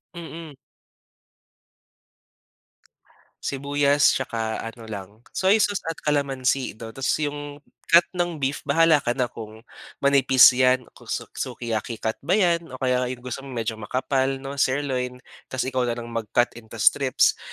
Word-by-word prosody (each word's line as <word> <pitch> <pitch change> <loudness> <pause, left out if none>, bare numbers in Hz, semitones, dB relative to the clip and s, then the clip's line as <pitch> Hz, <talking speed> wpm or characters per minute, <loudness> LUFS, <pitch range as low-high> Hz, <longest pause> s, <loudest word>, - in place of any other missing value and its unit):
Mm. 165 -2 -8 2.9
Sibuyas 140 +1 +2
tsaka 115 -3 -3
ano 115 0 -8
lang, 100 -3 -7 0.2
soy 200 +3 +3
sauce 205 -1 0
at 165 - -2
kalamansi 135 -4 0
'no 115 0 -8
tapos 135 +2 0
'yong 145 0 -5 0.3
cut 170 +1 +8
ng 175 -2 -1
beef 135 0 -2
bahala 160 +1 +5
ka 120 +1 -1
na 125 -2 0
kung 110 0 -10 0.4
manipis 135 -2 +7
yan, 130 0 +3
kung - - -17
su - - -2
sukiyaki 115 -1 -4
cut 110 0 -1
ba 180 +4 +1
'yan 170 -4 +2
o 130 - -9
kaya 125 -1 0
'yong 125 -1 -6
gusto 125 +1 -5
mong 135 -2 -9
medyo 110 -1 -3
makapal, 130 +4 0 0.2
'no, 140 0 -6
sirloin 130 -2 -1 0.2
tapos 130 - -2
ikaw 125 -1 0
na 120 - -1
lang 120 -1 -7
mag-cut 115 +1 0
into 110 -1 -13
strips. - - +3
130 Hz, 145 wpm, -24 LUFS, 120-145 Hz, 2.9 s, cut